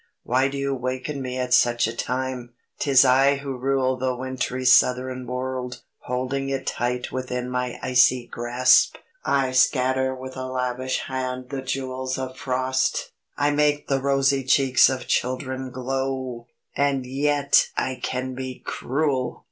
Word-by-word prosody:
Why 130 Hz, +2 st, +2 dB
do 140 Hz, 0 st, -5 dB
you 140 Hz, 0 st, -1 dB
waken 130 Hz, +2 st, -3 dB
me 130 Hz, -1 st, -4 dB
at 125 Hz, -1 st, -1 dB
such 120 Hz, -1 st, +4 dB
a 115 Hz, +1 st, -3 dB
time? 125 Hz, -1 st, -3 dB, 0.2 s
'Tis 135 Hz, -2 st, +5 dB
I 135 Hz, +2 st, +5 dB
who 135 Hz, -1 st, -5 dB
rule 130 Hz, 0 st, 0 dB
the 130 Hz, 0 st, -1 dB
wintry 130 Hz, 0 st, -3 dB
southern 125 Hz, 0 st, +3 dB
world, 125 Hz, 0 st, -4 dB, 0.2 s
holding 130 Hz, +2 st, -3 dB
it 135 Hz, -1 st, -3 dB
tight 125 Hz, +1 st, -2 dB
within 125 Hz, -1 st, -3 dB
my 125 Hz, -1 st, -2 dB
icy 125 Hz, -1 st, +4 dB
grasp. 120 Hz, +2 st, +3 dB, 0.3 s
I 135 Hz, -2 st, +1 dB
scatter 130 Hz, 0 st, +2 dB
with 130 Hz, 0 st, -8 dB
a 130 Hz, 0 st, -4 dB
lavish 130 Hz, 0 st, -2 dB
hand 130 Hz, -1 st, -4 dB
the 135 Hz, -1 st, -3 dB
jewels 130 Hz, -1 st, -3 dB
of 130 Hz, 0 st, -5 dB
frost! 130 Hz, 0 st, -1 dB, 0.3 s
I 145 Hz, 0 st, +2 dB
make 145 Hz, 0 st, +1 dB
the 135 Hz, -1 st, +1 dB
rosy 135 Hz, 0 st, +2 dB
cheeks 130 Hz, 0 st, +5 dB
of 130 Hz, -1 st, -3 dB
children 130 Hz, +1 st, -2 dB
glow! 130 Hz, -1 st, -3 dB, 0.3 s
And 140 Hz, -2 st, +1 dB
yet 140 Hz, +2 st, +2 dB
I 130 Hz, -1 st, -1 dB
can 130 Hz, 0 st, -3 dB
be 130 Hz, 0 st, -7 dB
cruel! 135 Hz, -2 st, -1 dB
130 Hz, 150 wpm, -24 LUFS, 125-135 Hz, 0.3 s, Tis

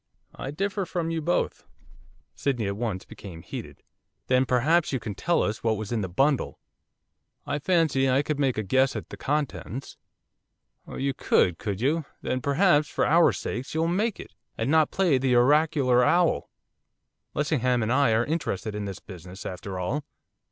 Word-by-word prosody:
'I 135 Hz, -, -6 dB
differ 195 Hz, +6 st, -2 dB
from 165 Hz, -2 st, -2 dB
you 165 Hz, -1 st, -2 dB
both.' 175 Hz, +3 st, -1 dB, 0.7 s
Sydney 125 Hz, -6 st, -1 dB
at 100 Hz, 0 st, -2 dB
once 105 Hz, -4 st, -3 dB
became 95 Hz, -6 st, -10 dB
heated. -, -, -8 dB, 0.4 s
'Then 130 Hz, 0 st, +2 dB
perhaps 155 Hz, +7 st, +2 dB
you 130 Hz, -, -1 dB
can 110 Hz, -2 st, -5 dB
tell 170 Hz, -, +1 dB
us 110 Hz, +1 st, -3 dB
what 110 Hz, -2 st, +1 dB
was 110 Hz, 0 st, -6 dB
in 115 Hz, -3 st, 0 dB
the 95 Hz, -, -3 dB
bundle?' 135 Hz, +10 st, +1 dB, 0.9 s
'I 150 Hz, -, -2 dB
fancy 150 Hz, -5 st, +2 dB
I 135 Hz, +3 st, +3 dB
could 150 Hz, -1 st, -2 dB
make 135 Hz, -4 st, +1 dB
a 110 Hz, -, 0 dB
guess 130 Hz, +6 st, +2 dB
at -, -, -6 dB
the -, -, -7 dB
contents.' 140 Hz, -3 st, -3 dB, 0.9 s
'Oh -, -, -8 dB
you 135 Hz, 0 st, -1 dB
could, 90 Hz, -8 st, +2 dB
could 100 Hz, -1 st, -3 dB
you, 150 Hz, +4 st, +1 dB, 0.2 s
then, 130 Hz, -, -1 dB
perhaps, 150 Hz, +2 st, +3 dB
for -, -, 0 dB
our 170 Hz, +2 st, +5 dB
sakes, 125 Hz, +6 st, -5 dB
you'll 160 Hz, +1 st, +1 dB
make 205 Hz, +5 st, 0 dB
it, -, -, -10 dB, 0.2 s
and 115 Hz, +5 st, -1 dB
not 160 Hz, -2 st, +4 dB
play 175 Hz, -9 st, +2 dB
the 130 Hz, -1 st, +2 dB
oracular 130 Hz, -1 st, +4 dB
owl! 175 Hz, +6 st, +2 dB, 0.9 s
Lessingham 130 Hz, -5 st, +1 dB
and 110 Hz, +3 st, 0 dB
I 140 Hz, -3 st, +4 dB
are 115 Hz, +2 st, +2 dB
interested 120 Hz, -, -2 dB
in 105 Hz, 0 st, -4 dB
this 95 Hz, -1 st, -6 dB
business, 95 Hz, +1 st, -11 dB
after 95 Hz, +1 st, -5 dB
all. 115 Hz, +12 st, -2 dB
130 Hz, 175 wpm, -26 LUFS, 110-155 Hz, 0.9 s, our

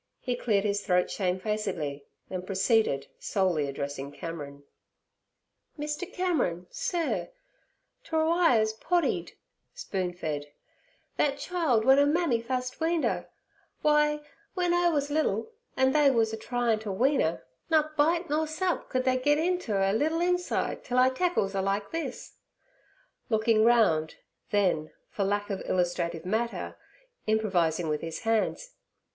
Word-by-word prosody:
He 250 Hz, -, -2 dB
cleared 210 Hz, -5 st, +1 dB
his 205 Hz, 0 st, 0 dB
throat 180 Hz, -2 st, +2 dB
shamefacedly, 185 Hz, -7 st, -2 dB, 0.2 s
then 185 Hz, -1 st, -4 dB
proceeded, 195 Hz, -, +1 dB
solely 175 Hz, -7 st, 0 dB
addressing 140 Hz, 0 st, -5 dB
Cameron: 145 Hz, -4 st, -7 dB, 1.1 s
'Mr. 300 Hz, +5 st, -4 dB
Cameron, 270 Hz, -, 0 dB
sur, 340 Hz, -2 st, -2 dB, 0.7 s
't -, -, -18 dB
were 315 Hz, 0 st, +2 dB
I 335 Hz, -6 st, +4 dB
ez 220 Hz, 0 st, +1 dB
poddied' 345 Hz, +10 st, 0 dB, 0.4 s
(spoon 190 Hz, -, -3 dB
fed) 150 Hz, -4 st, -4 dB, 0.7 s
'thet 280 Hz, -1 st, +2 dB
child 315 Hz, -12 st, +1 dB
w'en 265 Hz, +3 st, +6 dB
'er 285 Hz, +1 st, +4 dB
mammy 310 Hz, -8 st, +1 dB
fust 255 Hz, +1 st, -3 dB
weaned 325 Hz, 0 st, +1 dB
'er. -, -, -1 dB, 0.6 s
W'y, 300 Hz, 0 st, +3 dB, 0.3 s
w'en 355 Hz, -2 st, +1 dB
'er 350 Hz, 0 st, +3 dB
wuz 290 Hz, -2 st, -1 dB
liddle, 315 Hz, +8 st, 0 dB, 0.3 s
an' 265 Hz, 0 st, +4 dB
they 295 Hz, 0 st, +5 dB
wuz 225 Hz, -4 st, +2 dB
a -, -, 0 dB
tryin' 235 Hz, 0 st, 0 dB
ter 215 Hz, -1 st, -6 dB
wean 265 Hz, +9 st, +2 dB
'er, 160 Hz, -5 st, -1 dB, 0.3 s
nut 310 Hz, -1 st, +2 dB
bite 330 Hz, +4 st, +2 dB
nor 310 Hz, +1 st, 0 dB
sup 350 Hz, +3 st, -2 dB
could 255 Hz, 0 st, 0 dB
they 255 Hz, 0 st, +2 dB
get 290 Hz, +3 st, +3 dB
inter 320 Hz, -, 0 dB
'er 195 Hz, 0 st, +2 dB
liddle 315 Hz, +8 st, +1 dB
inside 360 Hz, 0 st, 0 dB
till 250 Hz, -, -2 dB
I 255 Hz, +1 st, +6 dB
tackles 260 Hz, -, 0 dB
'er 195 Hz, -, 0 dB
like 195 Hz, +1 st, -1 dB
this'—looking 240 Hz, -, -3 dB
round; 215 Hz, -10 st, +3 dB, 0.3 s
then, 180 Hz, -7 st, +1 dB, 0.2 s
for 200 Hz, -, -1 dB
lack 205 Hz, +1 st, -1 dB
of 195 Hz, -, -3 dB
illustrative 175 Hz, -2 st, -1 dB
matter, 225 Hz, +5 st, -2 dB, 0.5 s
improvising 180 Hz, -7 st, +1 dB
with 150 Hz, -1 st, -1 dB
his 165 Hz, -1 st, -5 dB
hands. 225 Hz, -, 0 dB
230 Hz, 140 wpm, -28 LUFS, 190-305 Hz, 1.1 s, w'en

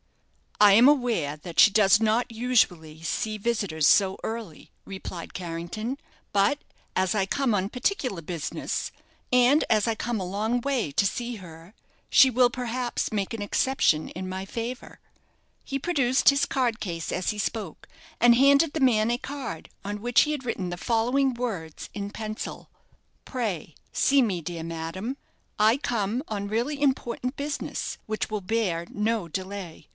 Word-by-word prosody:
"I 205 Hz, -1 st, +8 dB
am 235 Hz, +6 st, +7 dB
aware 235 Hz, -, +2 dB
that 165 Hz, +2 st, -5 dB
she 210 Hz, -, +8 dB
does 205 Hz, 0 st, +5 dB
not 225 Hz, +2 st, +1 dB
usually 180 Hz, -10 st, +1 dB
see 215 Hz, +6 st, -2 dB
visitors 200 Hz, -9 st, 0 dB
so 195 Hz, -2 st, +4 dB
early," 220 Hz, -8 st, -6 dB
replied 190 Hz, -3 st, -7 dB
Carrington; 180 Hz, +8 st, -4 dB, 0.4 s
"but 205 Hz, +8 st, +3 dB, 0.4 s
as 185 Hz, +2 st, +1 dB
I 195 Hz, -2 st, +2 dB
come 255 Hz, +2 st, +1 dB
on 195 Hz, 0 st, 0 dB
particular 250 Hz, -, -1 dB
business, 165 Hz, -1 st, -4 dB, 0.4 s
and 250 Hz, +5 st, +5 dB
as 215 Hz, 0 st, +3 dB
I 225 Hz, -, +1 dB
come 235 Hz, 0 st, -2 dB
a 185 Hz, -, -3 dB
long 215 Hz, +6 st, -1 dB
way 255 Hz, -, -1 dB
to 170 Hz, -, +2 dB
see 240 Hz, +4 st, -2 dB
her, 170 Hz, 0 st, -12 dB, 0.4 s
she 265 Hz, -, +8 dB
will 250 Hz, 0 st, +4 dB
perhaps 245 Hz, 0 st, -2 dB
make 205 Hz, 0 st, -2 dB
an 225 Hz, -, -4 dB
exception 205 Hz, -7 st, +1 dB
in 185 Hz, +1 st, -6 dB
my 190 Hz, +1 st, -4 dB
favour." 235 Hz, +4 st, -6 dB, 0.6 s
He 275 Hz, 0 st, -3 dB
produced 270 Hz, -5 st, +3 dB
his 280 Hz, 0 st, +3 dB
card 245 Hz, -4 st, 0 dB
case 170 Hz, -5 st, -4 dB
as 185 Hz, +3 st, -1 dB
he 210 Hz, -, -6 dB
spoke, 205 Hz, -5 st, -4 dB, 0.3 s
and 240 Hz, 0 st, +6 dB
handed 280 Hz, +4 st, +5 dB
the 320 Hz, -, -2 dB
man 230 Hz, -5 st, +3 dB
a 240 Hz, -, +1 dB
card, 265 Hz, -, -6 dB
on 205 Hz, +1 st, -5 dB
which 240 Hz, +1 st, +4 dB
he 300 Hz, -, +1 dB
had 285 Hz, -4 st, -4 dB
written 190 Hz, -6 st, -2 dB
the 175 Hz, -, -4 dB
following 245 Hz, +6 st, +1 dB
words 200 Hz, -11 st, -5 dB
in 200 Hz, 0 st, -4 dB
pencil: 215 Hz, 0 st, -6 dB, 0.6 s
"_Pray 210 Hz, -, -3 dB, 0.2 s
see 275 Hz, 0 st, +4 dB
me, 195 Hz, -8 st, 0 dB
dear 165 Hz, 0 st, -5 dB
madame. 165 Hz, +10 st, -5 dB, 0.4 s
I 220 Hz, +4 st, +4 dB
come 230 Hz, -3 st, -1 dB
on 200 Hz, -2 st, -3 dB
really 240 Hz, +8 st, -1 dB
important 260 Hz, -2 st, 0 dB
business, 285 Hz, +1 st, -4 dB
which 215 Hz, 0 st, -3 dB
will 215 Hz, -1 st, -3 dB
bear 185 Hz, -5 st, -1 dB
no 215 Hz, -3 st, -1 dB
delay. 185 Hz, 0 st, -6 dB
220 Hz, 160 wpm, -26 LUFS, 185-245 Hz, 0.6 s, I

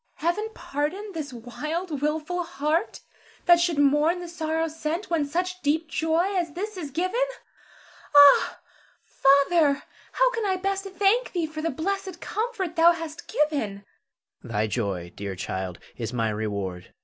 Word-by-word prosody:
Zara. 335 Hz, +3 st, +2 dB
Heaven 425 Hz, +4 st, -4 dB
pardon 325 Hz, +9 st, -3 dB
this 305 Hz, -4 st, -5 dB
wild, 295 Hz, +7 st, -4 dB
wilful 310 Hz, +4 st, -1 dB
heart 310 Hz, +1 st, -1 dB, 0.4 s
that 345 Hz, -1 st, +7 dB
should 345 Hz, -3 st, +1 dB
mourn 295 Hz, +5 st, +3 dB
the 350 Hz, -, -6 dB
sorrow 325 Hz, -1 st, -1 dB
sent, 320 Hz, +4 st, -4 dB
when 320 Hz, -3 st, +2 dB
such 365 Hz, +4 st, -2 dB
deep 315 Hz, +2 st, +1 dB
joy 330 Hz, +5 st, +1 dB
as 340 Hz, -4 st, -1 dB
this 415 Hz, +5 st, -4 dB
is 330 Hz, -6 st, -5 dB
given. 370 Hz, -, -1 dB, 0.9 s
Ah, 285 Hz, -1 st, +7 dB, 0.4 s
Father, 280 Hz, +1 st, +3 dB, 0.3 s
how -, -, +3 dB
can 455 Hz, -2 st, -2 dB
I 380 Hz, -, +2 dB
best 390 Hz, +1 st, -2 dB
thank 395 Hz, +5 st, +1 dB
thee 345 Hz, -3 st, 0 dB
for 310 Hz, 0 st, -6 dB
the 330 Hz, -, 0 dB
blessed 375 Hz, +4 st, -3 dB
comfort 425 Hz, -7 st, -3 dB
thou 335 Hz, +1 st, +7 dB
hast 325 Hz, -2 st, -7 dB
given? 225 Hz, -10 st, 0 dB, 0.6 s
Her. -, -, -12 dB
Thy 110 Hz, -1 st, +1 dB
joy, 100 Hz, -6 st, -2 dB
dear 100 Hz, -1 st, -5 dB
child, 95 Hz, 0 st, -4 dB, 0.2 s
is 115 Hz, -2 st, -4 dB
my 115 Hz, -3 st, 0 dB
reward. 100 Hz, -4 st, -4 dB
320 Hz, 155 wpm, -26 LUFS, 280-360 Hz, 0.9 s, that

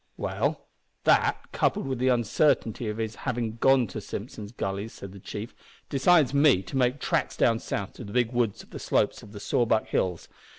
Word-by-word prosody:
"Well, -, -, -2 dB, 0.4 s
that, -, -, +2 dB
coupled -, -, 0 dB
with 130 Hz, -2 st, -3 dB
the 130 Hz, -, +1 dB
uncertainty 120 Hz, -1 st, +2 dB
of 105 Hz, -, -4 dB
his 110 Hz, -1 st, -3 dB
having 120 Hz, -3 st, -3 dB
gone 135 Hz, +1 st, +4 dB
to 110 Hz, +1 st, -7 dB
Simpson's 105 Hz, 0 st, -7 dB
Gully," 100 Hz, -2 st, -3 dB
said 100 Hz, -4 st, -10 dB
the 100 Hz, -, -11 dB
chief, 105 Hz, +5 st, -7 dB, 0.4 s
"decides 145 Hz, 0 st, +4 dB
me 140 Hz, -9 st, +4 dB
to 90 Hz, -, -8 dB
make 130 Hz, +1 st, +2 dB
tracks -, -, -1 dB
down 115 Hz, -1 st, +3 dB
south 100 Hz, -3 st, -4 dB
to -, -, -9 dB
the 100 Hz, -, -9 dB
big 120 Hz, 0 st, +1 dB
woods 120 Hz, -4 st, 0 dB
on -, -, -22 dB
the -, -, -7 dB
slopes -, -, 0 dB
of 100 Hz, -, -13 dB
the 105 Hz, -, -9 dB
Sawback 110 Hz, +1 st, +1 dB
Hills. 90 Hz, -3 st, -1 dB
115 Hz, 195 wpm, -27 LUFS, 105-125 Hz, 0.4 s, gone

